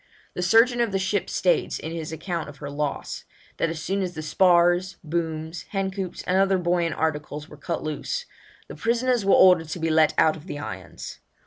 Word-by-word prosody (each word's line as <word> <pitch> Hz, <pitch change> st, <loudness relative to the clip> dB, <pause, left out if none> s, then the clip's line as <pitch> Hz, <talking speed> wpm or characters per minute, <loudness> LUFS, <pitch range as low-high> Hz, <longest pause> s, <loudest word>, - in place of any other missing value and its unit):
The -, -, -4 dB
surgeon 230 Hz, +6 st, +4 dB
of 235 Hz, -3 st, +1 dB
the 195 Hz, -, +1 dB
ship 190 Hz, +1 st, -1 dB
states, 180 Hz, -, +1 dB
in 160 Hz, -, -6 dB
his 160 Hz, -1 st, -5 dB
account 165 Hz, 0 st, -4 dB
of 145 Hz, -, -12 dB
her 145 Hz, -1 st, -7 dB
loss, 145 Hz, -1 st, -3 dB, 0.3 s
that 165 Hz, -, +1 dB
as 165 Hz, -1 st, -4 dB
soon 195 Hz, +4 st, -1 dB
as 180 Hz, -2 st, -3 dB
the 155 Hz, -, -5 dB
spars, 175 Hz, +2 st, +3 dB
booms, 160 Hz, 0 st, -3 dB
hen 195 Hz, -1 st, -1 dB
coops, 190 Hz, -2 st, -5 dB
and 185 Hz, +1 st, +1 dB
other 195 Hz, 0 st, +3 dB
buoyant 175 Hz, -1 st, 0 dB
articles 150 Hz, -1 st, -2 dB
were -, -, -12 dB
cut 170 Hz, -, -4 dB
loose, 485 Hz, -, -3 dB, 0.4 s
'the -, -, -9 dB
prisoners 240 Hz, -1 st, +1 dB
were 195 Hz, -, +5 dB
ordered 180 Hz, -4 st, +6 dB
to 165 Hz, -, -4 dB
be 165 Hz, 0 st, 0 dB
let 155 Hz, -1 st, +4 dB
out 160 Hz, -, +4 dB
of 160 Hz, +4 st, -12 dB
irons.' 95 Hz, -11 st, -7 dB
175 Hz, 200 wpm, -25 LUFS, 155-190 Hz, 0.4 s, ordered